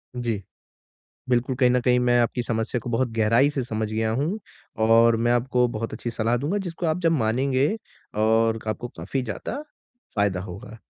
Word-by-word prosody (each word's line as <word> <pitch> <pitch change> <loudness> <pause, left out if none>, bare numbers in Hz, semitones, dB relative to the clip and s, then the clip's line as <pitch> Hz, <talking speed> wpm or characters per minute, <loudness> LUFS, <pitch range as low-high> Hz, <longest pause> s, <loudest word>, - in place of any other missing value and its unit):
जी। 115 -4 -2 0.9
बिल्कुल, 125 +1 +1
कहीं 125 -1 +4
न 125 0 +3
कहीं 125 0 +3
मैं 120 0 +3
आपकी 120 +1 0
समस्या 115 +1 -1
को - - -4
बहुत 120 +2 +1
गहराई 115 +5 +4
से 140 -3 -2
समझ 110 -2 -3
गया 110 0 0
हूँ, 150 - -1 0.4
और 115 +1 +5
मैं 120 +1 +2
आपको 125 0 +2
बहुत 115 +1 -4
अच्छी 120 - -4
सलाह 115 +1 0
दूँगा 150 +11 -1
जिसको 170 +1 -4
आप 160 +2 +1
जब 165 -2 +3
मानेंगे 130 +1 +2 0.5
और 115 0 +3
आपको 110 +3 -3
काफ़ी 95 +11 -2
ज़्यादा 125 - -5 0.5
फ़ायदा 100 -3 +1
होगा। 100 +5 -9
120 Hz, 175 wpm, -24 LUFS, 110-130 Hz, 0.9 s, और